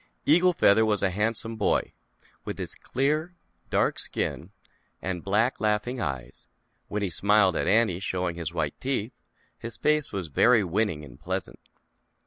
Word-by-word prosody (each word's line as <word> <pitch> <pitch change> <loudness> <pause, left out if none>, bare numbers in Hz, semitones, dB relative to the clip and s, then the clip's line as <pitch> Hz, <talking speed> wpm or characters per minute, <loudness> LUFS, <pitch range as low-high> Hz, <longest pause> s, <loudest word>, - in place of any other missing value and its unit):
Eagle 180 +4 +5
Feather 110 -8 +4
was 105 -2 +1
a 95 - +2
handsome 110 +3 -2
boy, 105 - 0 0.5
with - - -5
his - - -6
clear, 155 +6 -1 0.3
dark - - +1
skin 85 - -1 0.5
and 90 -2 -4
black 110 +6 +1
laughing 110 +4 0
eyes; 65 -3 -5 0.4
when 105 0 -3
he 100 - 0
smiled 100 0 +3
at - - -1
Annie 105 -4 +3
showing 90 -2 -2
his 85 -1 -4
white 80 -4 -2
teeth, 125 -3 -2 0.5
his 115 -1 -7
face 150 -1 +3
was 95 -4 -4
very 115 - +4
winning 90 -4 -1
and 65 - -14
pleasant. - - -4
105 Hz, 150 wpm, -26 LUFS, 90-115 Hz, 0.5 s, Eagle